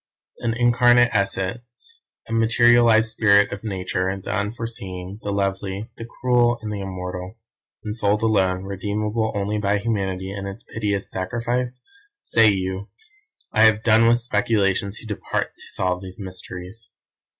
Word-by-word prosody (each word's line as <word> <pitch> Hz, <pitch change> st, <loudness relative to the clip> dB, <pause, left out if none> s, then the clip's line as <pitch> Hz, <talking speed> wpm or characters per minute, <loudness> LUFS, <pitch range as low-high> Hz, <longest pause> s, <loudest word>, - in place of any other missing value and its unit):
An 115 Hz, -1 st, -1 dB
incarnate 120 Hz, 0 st, +4 dB
essence, 120 Hz, -, -3 dB, 0.3 s
a 115 Hz, -, -5 dB
materialised 115 Hz, 0 st, +4 dB
spirit 100 Hz, -2 st, +4 dB
of 100 Hz, -, -6 dB
Nature 95 Hz, -2 st, -2 dB
the -, -, -4 dB
unforeseeing, 100 Hz, -3 st, -4 dB
the 105 Hz, -, -4 dB
lovely, 100 Hz, +1 st, -2 dB
the 115 Hz, -, -7 dB
cruel 120 Hz, -1 st, +2 dB
and 105 Hz, -, -4 dB
the 100 Hz, -, -4 dB
immortal; 90 Hz, +1 st, -6 dB, 0.5 s
ensouled 105 Hz, 0 st, 0 dB
alone, 95 Hz, -4 st, +2 dB
redeemable 105 Hz, +3 st, -2 dB
only 105 Hz, +1 st, -1 dB
by 100 Hz, 0 st, +1 dB
Humanity 95 Hz, -3 st, -2 dB
and 100 Hz, 0 st, -5 dB
its 100 Hz, -, -8 dB
piteous 105 Hz, -3 st, -3 dB
sacrifice? 120 Hz, +6 st, -2 dB, 0.4 s
Say 115 Hz, -, +4 dB
you! 95 Hz, +1 st, -2 dB, 0.6 s
I 110 Hz, -, +2 dB
have 110 Hz, 0 st, +4 dB
done 115 Hz, 0 st, +5 dB
with 120 Hz, +1 st, +5 dB
speculations 105 Hz, -3 st, 0 dB
who -, -, -9 dB
depart 105 Hz, -2 st, -3 dB
to -, -, -11 dB
solve 90 Hz, -1 st, -1 dB
these 95 Hz, 0 st, -10 dB
mysteries. 95 Hz, +2 st, -8 dB
105 Hz, 140 wpm, -22 LUFS, 95-115 Hz, 0.6 s, done